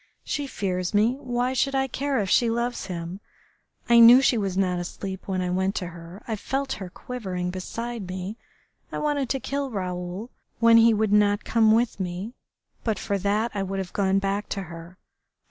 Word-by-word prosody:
She 290 Hz, -2 st, -3 dB
fears 185 Hz, -5 st, -2 dB
me. 225 Hz, +5 st, +3 dB
Why 250 Hz, -1 st, -1 dB
should 275 Hz, +1 st, +1 dB
I 270 Hz, 0 st, +2 dB
care 275 Hz, +2 st, -1 dB
if 205 Hz, -4 st, 0 dB
she 235 Hz, +4 st, +3 dB
loves 235 Hz, -2 st, -2 dB
him.... 175 Hz, 0 st, -5 dB, 0.7 s
I 235 Hz, 0 st, +6 dB
knew 235 Hz, +2 st, +10 dB
she 265 Hz, -2 st, +3 dB
was 195 Hz, -4 st, -1 dB
not 180 Hz, -2 st, +1 dB
asleep 190 Hz, +2 st, -6 dB
when 185 Hz, -1 st, -1 dB
I 180 Hz, -, -1 dB
went 190 Hz, +2 st, 0 dB
to 180 Hz, -3 st, -3 dB
her. 170 Hz, +2 st, -11 dB
I 225 Hz, -, -1 dB
felt 270 Hz, +6 st, -2 dB
her 185 Hz, -, -5 dB
quivering 185 Hz, -6 st, -4 dB
beside 230 Hz, +3 st, -5 dB
me.... 185 Hz, +3 st, -5 dB, 0.6 s
I -, -, -4 dB
wanted 290 Hz, -4 st, 0 dB
to 270 Hz, -, 0 dB
kill 275 Hz, +1 st, -3 dB
Raoul 185 Hz, +1 st, -4 dB, 0.3 s
when 230 Hz, 0 st, +7 dB
he 230 Hz, 0 st, +7 dB
would 215 Hz, -1 st, +1 dB
not 205 Hz, 0 st, +3 dB
come 220 Hz, -1 st, +4 dB
with 230 Hz, -1 st, +2 dB
me, 185 Hz, +5 st, -4 dB, 0.5 s
but 220 Hz, -3 st, 0 dB
for 200 Hz, -1 st, -2 dB
that 210 Hz, +4 st, 0 dB
I 200 Hz, -, -2 dB
would 195 Hz, 0 st, -3 dB
have 190 Hz, -2 st, -4 dB
gone 195 Hz, -1 st, +2 dB
back 195 Hz, +1 st, -1 dB
to 195 Hz, -, -3 dB
her.... 170 Hz, +1 st, -10 dB
205 Hz, 195 wpm, -25 LUFS, 185-235 Hz, 0.7 s, knew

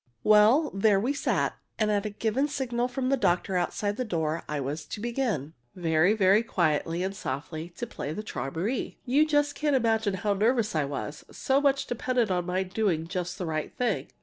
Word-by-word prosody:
Well, 215 Hz, +9 st, +5 dB
there 195 Hz, 0 st, +3 dB
we 250 Hz, +8 st, 0 dB
sat, 285 Hz, -, 0 dB, 0.2 s
and 215 Hz, -1 st, +1 dB
at 205 Hz, 0 st, 0 dB
a -, -, -3 dB
given 225 Hz, +7 st, 0 dB
signal 250 Hz, -4 st, -1 dB
from 255 Hz, 0 st, -2 dB
the 275 Hz, -, +3 dB
doctor 185 Hz, -4 st, +1 dB
outside 205 Hz, +4 st, -1 dB
the 255 Hz, -, 0 dB
door 165 Hz, -6 st, -1 dB
I 150 Hz, -1 st, -2 dB
was 145 Hz, +3 st, -3 dB
to -, -, -6 dB
begin 230 Hz, -, -2 dB, 0.2 s
very, 170 Hz, +2 st, +3 dB
very 200 Hz, 0 st, +4 dB
quietly 170 Hz, -4 st, 0 dB
and 195 Hz, +1 st, -3 dB
softly 155 Hz, +2 st, -5 dB
to 240 Hz, -, -3 dB
play 150 Hz, -9 st, -6 dB
the 210 Hz, +7 st, -5 dB
"Träumerei." 170 Hz, -, -3 dB
You 265 Hz, +4 st, +3 dB
can -, -, -9 dB
just 290 Hz, 0 st, +1 dB
imagine 225 Hz, -8 st, +2 dB
how 205 Hz, +2 st, 0 dB
nervous 220 Hz, +2 st, +1 dB
I 155 Hz, -3 st, +1 dB
was 145 Hz, +2 st, -5 dB
so 270 Hz, +1 st, +1 dB
much 275 Hz, -1 st, +2 dB
depended 245 Hz, -3 st, 0 dB
on 180 Hz, -1 st, 0 dB
my 185 Hz, +1 st, 0 dB
doing 185 Hz, -4 st, -1 dB
just 180 Hz, +1 st, -4 dB
the 185 Hz, -, -3 dB
right 155 Hz, -2 st, -3 dB
thing! 250 Hz, -1 st, 0 dB
205 Hz, 195 wpm, -27 LUFS, 170-245 Hz, 0.2 s, Well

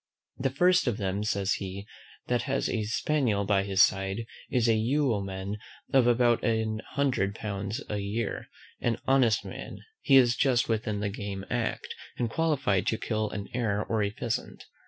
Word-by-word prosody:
The 135 Hz, +1 st, +1 dB
first 180 Hz, +5 st, +3 dB
of 115 Hz, -4 st, +1 dB
them, 100 Hz, +1 st, -1 dB
says 100 Hz, -2 st, 0 dB
he, 100 Hz, +1 st, -5 dB, 0.4 s
that 125 Hz, -1 st, +1 dB
has 135 Hz, 0 st, +1 dB
a 110 Hz, -2 st, -1 dB
spaniel 115 Hz, -3 st, +1 dB
by 100 Hz, -1 st, +3 dB
his 100 Hz, 0 st, +4 dB
side, 95 Hz, +3 st, 0 dB, 0.2 s
is 120 Hz, -2 st, +2 dB
a 115 Hz, -, +5 dB
yeoman 105 Hz, -5 st, 0 dB, 0.3 s
of 130 Hz, -3 st, +5 dB
about 120 Hz, -1 st, +3 dB
an 110 Hz, -2 st, 0 dB
hundred 125 Hz, -8 st, +1 dB
pounds 100 Hz, -1 st, -4 dB
a 105 Hz, -, -2 dB
year, 100 Hz, +3 st, -3 dB, 0.3 s
an 120 Hz, -2 st, +1 dB
honest 125 Hz, -5 st, +3 dB
man: -, -, -7 dB, 0.2 s
he 135 Hz, -, +4 dB
is 125 Hz, -2 st, +6 dB
just 125 Hz, -4 st, +2 dB
within 110 Hz, -2 st, -1 dB
the 105 Hz, -, 0 dB
game 100 Hz, -1 st, -5 dB
act, 120 Hz, -2 st, -2 dB, 0.2 s
and 120 Hz, -2 st, -1 dB
qualified 140 Hz, -, +1 dB
to 110 Hz, -, +1 dB
kill 110 Hz, -1 st, -1 dB
an 100 Hz, -1 st, -5 dB
hare 110 Hz, -4 st, 0 dB
or 110 Hz, -1 st, 0 dB
a 100 Hz, -, +1 dB
pheasant. 115 Hz, +2 st, -4 dB
110 Hz, 170 wpm, -28 LUFS, 100-125 Hz, 0.4 s, is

